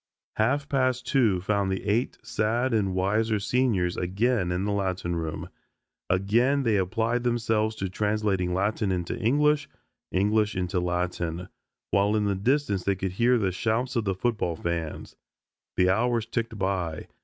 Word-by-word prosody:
Half 140 Hz, +7 st, +1 dB
past 130 Hz, -3 st, 0 dB
two 110 Hz, -9 st, +2 dB
found 100 Hz, 0 st, 0 dB
the 95 Hz, -, -2 dB
eight 105 Hz, +5 st, 0 dB
sad 115 Hz, +4 st, 0 dB
and 100 Hz, -4 st, +1 dB
wiser 105 Hz, +4 st, +1 dB
seniors 105 Hz, -5 st, +1 dB
again 95 Hz, +1 st, 0 dB
in 90 Hz, +2 st, -1 dB
the 105 Hz, -, 0 dB
Latin 95 Hz, -3 st, -1 dB
room. 80 Hz, -2 st, -4 dB, 0.6 s
Again 120 Hz, +9 st, +2 dB
they 110 Hz, -4 st, +2 dB
applied 115 Hz, +6 st, 0 dB
themselves 110 Hz, -2 st, 0 dB
to 95 Hz, -3 st, -3 dB
translating 105 Hz, -2 st, 0 dB
Latin 100 Hz, +2 st, 0 dB
into 90 Hz, -2 st, -2 dB
English, 150 Hz, +5 st, +2 dB, 0.4 s
English 105 Hz, +2 st, +2 dB
into 90 Hz, 0 st, -1 dB
Latin, 90 Hz, 0 st, -2 dB, 0.4 s
while 100 Hz, +2 st, +3 dB
in 105 Hz, -1 st, +1 dB
the 100 Hz, -, +1 dB
distance 105 Hz, -1 st, 0 dB
they 100 Hz, -, +1 dB
could 95 Hz, 0 st, -3 dB
hear 120 Hz, +6 st, +3 dB
the 100 Hz, -4 st, 0 dB
shouts 115 Hz, +7 st, -1 dB
of 115 Hz, -2 st, 0 dB
the 95 Hz, -1 st, 0 dB
football 105 Hz, -5 st, -1 dB
fans. 85 Hz, -1 st, -4 dB, 0.6 s
The 90 Hz, 0 st, +4 dB
hours 115 Hz, +2 st, +1 dB
ticked 115 Hz, -1 st, -3 dB
by. 95 Hz, -5 st, -2 dB
105 Hz, 155 wpm, -26 LUFS, 95-115 Hz, 0.6 s, The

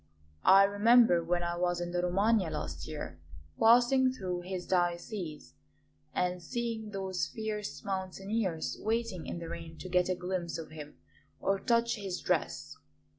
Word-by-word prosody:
I 195 Hz, +1 st, +8 dB
remember, 205 Hz, -2 st, +5 dB
when 175 Hz, +1 st, 0 dB
I 175 Hz, 0 st, -1 dB
was 175 Hz, 0 st, 0 dB
in 175 Hz, 0 st, -3 dB
the 175 Hz, 0 st, 0 dB
Romagna 195 Hz, +1 st, +2 dB
last 75 Hz, -, -5 dB
year, 80 Hz, +1 st, -6 dB, 0.4 s
passing 245 Hz, +3 st, +5 dB
through 185 Hz, -7 st, -4 dB
his 180 Hz, 0 st, -5 dB
diocese 175 Hz, -, -2 dB, 0.6 s
and 180 Hz, 0 st, -1 dB
seeing 230 Hz, +2 st, -3 dB
those 190 Hz, -2 st, -2 dB
fierce 210 Hz, -9 st, -5 dB
mountaineers 190 Hz, -1 st, -2 dB
waiting 220 Hz, -5 st, -1 dB
in -, -, -4 dB
the 170 Hz, -1 st, -6 dB
rain 165 Hz, -1 st, -7 dB
to 185 Hz, -, -8 dB
get 180 Hz, 0 st, +2 dB
a 185 Hz, -, +1 dB
glimpse 180 Hz, -1 st, -3 dB
of 160 Hz, -2 st, -8 dB
him 150 Hz, -1 st, -9 dB, 0.4 s
or 195 Hz, 0 st, +1 dB
touch 235 Hz, +1 st, +2 dB
his 195 Hz, -3 st, -4 dB
dress. -, -, -1 dB
185 Hz, 150 wpm, -31 LUFS, 175-215 Hz, 0.6 s, I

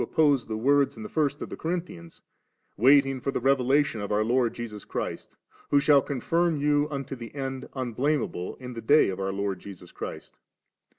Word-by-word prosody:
9& -, -, +1 dB
oppose 145 Hz, -5 st, +2 dB
the 110 Hz, -1 st, -3 dB
words 140 Hz, +4 st, +2 dB
in -, -, -7 dB
the 215 Hz, -, -7 dB
first 150 Hz, -7 st, 0 dB
to -, -, -5 dB
the -, -, -8 dB
Corinthians, 165 Hz, -, -5 dB, 0.3 s
* -, -, -49 dB
waiting 135 Hz, +2 st, +4 dB
for 140 Hz, -, -2 dB
the 135 Hz, -, -1 dB
revelation 135 Hz, -1 st, +2 dB
of 100 Hz, -, -4 dB
our 105 Hz, +1 st, +2 dB
Lord 120 Hz, +1 st, +2 dB
Jesus 110 Hz, -3 st, -7 dB
Christ, -, -, -5 dB, 0.3 s
who 145 Hz, -, +5 dB
shall 145 Hz, 0 st, +5 dB
also -, -, -7 dB
confirm 165 Hz, +4 st, 0 dB
you 145 Hz, 0 st, +2 dB
unto 140 Hz, -2 st, -5 dB
the 120 Hz, +1 st, -10 dB
end 135 Hz, -1 st, -5 dB
unblameable 130 Hz, -5 st, -1 dB
in 125 Hz, -1 st, -9 dB
the 115 Hz, -, -6 dB
day 145 Hz, +4 st, +5 dB
of 95 Hz, 0 st, -4 dB
our 95 Hz, 0 st, -1 dB
Lord 100 Hz, -1 st, -2 dB
Jesus 90 Hz, -3 st, -11 dB
Christ -, -, -8 dB
•.' -, -, -36 dB
135 Hz, 210 wpm, -27 LUFS, 115-145 Hz, 0.3 s, who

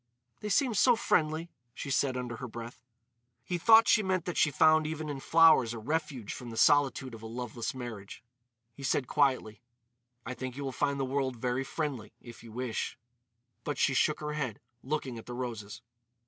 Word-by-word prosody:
"They 210 Hz, -, -5 dB
seem 255 Hz, +2 st, +2 dB
so 240 Hz, +4 st, +5 dB
friendly," 160 Hz, -5 st, 0 dB, 0.2 s
she 140 Hz, -, -5 dB
said 130 Hz, -1 st, +1 dB
under 120 Hz, -2 st, -4 dB
her 125 Hz, -, -6 dB
breath. 115 Hz, +1 st, -9 dB, 0.6 s
He 175 Hz, -1 st, -3 dB
thought 225 Hz, +5 st, +7 dB
she 220 Hz, -, +5 dB
meant 185 Hz, -3 st, -1 dB
that 175 Hz, -, -3 dB
she 155 Hz, -, +4 dB
found 155 Hz, +2 st, +4 dB
even 155 Hz, -1 st, -4 dB
in 140 Hz, -2 st, -4 dB
flowers 155 Hz, -7 st, +5 dB
a -, -, -5 dB
refuge 130 Hz, -2 st, -3 dB
from 125 Hz, -, -8 dB
the 115 Hz, -, -8 dB
solitude 135 Hz, -2 st, +3 dB
of 115 Hz, -, -9 dB
a 110 Hz, -, -7 dB
loveless 120 Hz, +1 st, -5 dB
marriage. 115 Hz, -6 st, -8 dB, 0.5 s
He 140 Hz, -, -13 dB
said 135 Hz, 0 st, 0 dB
quietly: 125 Hz, -6 st, +1 dB, 0.6 s
"I 130 Hz, -, -4 dB
think 130 Hz, 0 st, -6 dB
you 145 Hz, -, -4 dB
will 135 Hz, -, -3 dB
find 140 Hz, +1 st, -1 dB
the 135 Hz, -, 0 dB
world 130 Hz, -1 st, -1 dB
very 125 Hz, +2 st, -1 dB
friendly, 135 Hz, -5 st, -4 dB
if 120 Hz, -1 st, -12 dB
you 115 Hz, -, -11 dB
wish." 120 Hz, 0 st, -3 dB, 0.7 s
But 145 Hz, -, -3 dB
she 135 Hz, -, +2 dB
shook 150 Hz, +4 st, +2 dB
her 150 Hz, 0 st, -3 dB
head, 135 Hz, -8 st, -3 dB, 0.2 s
looking 130 Hz, -4 st, -3 dB
at -, -, -13 dB
the 120 Hz, -, -6 dB
roses. 115 Hz, -4 st, -6 dB
135 Hz, 190 wpm, -30 LUFS, 120-155 Hz, 0.7 s, thought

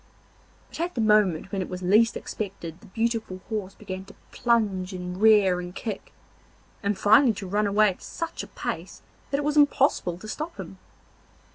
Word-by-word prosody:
But -, -, -10 dB
at 345 Hz, +2 st, -2 dB
the -, -, -2 dB
moment 210 Hz, -5 st, +3 dB
when 195 Hz, -2 st, -1 dB
it -, -, -4 dB
was 180 Hz, 0 st, -6 dB
least 215 Hz, +5 st, +4 dB
expected 185 Hz, -5 st, -6 dB
the -, -, -15 dB
beautiful 225 Hz, -2 st, -2 dB
horse 205 Hz, -4 st, -4 dB
began 190 Hz, -2 st, -7 dB
to -, -, -15 dB, 0.2 s
plunge 205 Hz, -6 st, +1 dB
and 180 Hz, +1 st, -6 dB
rear 205 Hz, -5 st, +5 dB
and 180 Hz, +1 st, -7 dB
kick, 215 Hz, -4 st, -5 dB, 0.7 s
and 200 Hz, -1 st, 0 dB
finally 220 Hz, +5 st, +5 dB
to 205 Hz, -1 st, -7 dB
run 205 Hz, +3 st, +1 dB
away 210 Hz, +1 st, +4 dB
at 185 Hz, -, -7 dB
such 330 Hz, 0 st, -5 dB
a -, -, -8 dB
pace -, -, -6 dB, 0.3 s
that 280 Hz, -, 0 dB
it 290 Hz, -, -1 dB
was 300 Hz, +1 st, 0 dB
impossible 275 Hz, -, +3 dB
to 215 Hz, -, -10 dB
stop 310 Hz, +9 st, -5 dB
him. -, -, -8 dB
205 Hz, 180 wpm, -26 LUFS, 185-230 Hz, 0.7 s, rear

